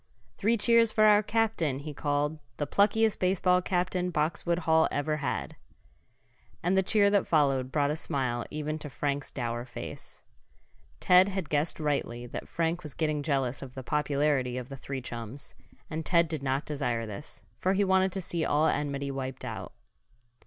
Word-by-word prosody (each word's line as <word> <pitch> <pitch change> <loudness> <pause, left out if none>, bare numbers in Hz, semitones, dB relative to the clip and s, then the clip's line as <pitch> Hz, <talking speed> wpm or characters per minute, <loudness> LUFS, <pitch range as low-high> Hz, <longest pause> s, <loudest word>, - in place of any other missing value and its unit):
"Three 230 +3 +2
cheers 230 +1 +4
for 215 - +3
our 210 -1 +7
captain!" 215 -10 0
he 150 +2 -7
called. 145 +1 -1 0.2
"The 145 - -1
pluckiest 215 +5 +2
baseball 180 0 +3
captain 180 0 0
Boxwood 170 +1 0
Hall 160 0 +4
ever 150 +1 -1
had." 150 - -3 1.1
And 180 +3 +2
the 190 - +5
cheer 200 +1 +3
that 200 -1 +2
followed 135 -5 +2
brought 145 0 +1
a - - -1
smile 130 -6 -2
even 155 +1 -3
to 150 - -6
Frank's 140 +1 -2
dour 120 -2 -3
face. 120 -1 -9 0.8
Ted 185 +2 +6
had 190 -5 -3
guessed 150 +3 0
rightly 140 -5 -2
that 120 - -7
Frank 170 +1 -1
was 150 -5 -8
getting 155 -2 0
jealous 135 -3 -1
of 130 -2 -9
the 130 - -6
popularity 145 -3 0
of 125 +1 -6
the 135 - -6
three 135 0 -6
chums, 120 +3 -7 0.3
and 160 0 -4
Ted 170 0 +3
did 155 -3 -3
not 135 +1 -1
desire 125 -6 -2
this, 110 +8 -8 0.2
for 185 - +2
he 200 +1 +2
wanted 190 0 +3
to 195 - -2
see 170 -1 -2
all 150 +1 +2
enmity 140 -2 -1
wiped 130 -1 -5
out. - - -6
150 Hz, 175 wpm, -29 LUFS, 135-180 Hz, 1.1 s, our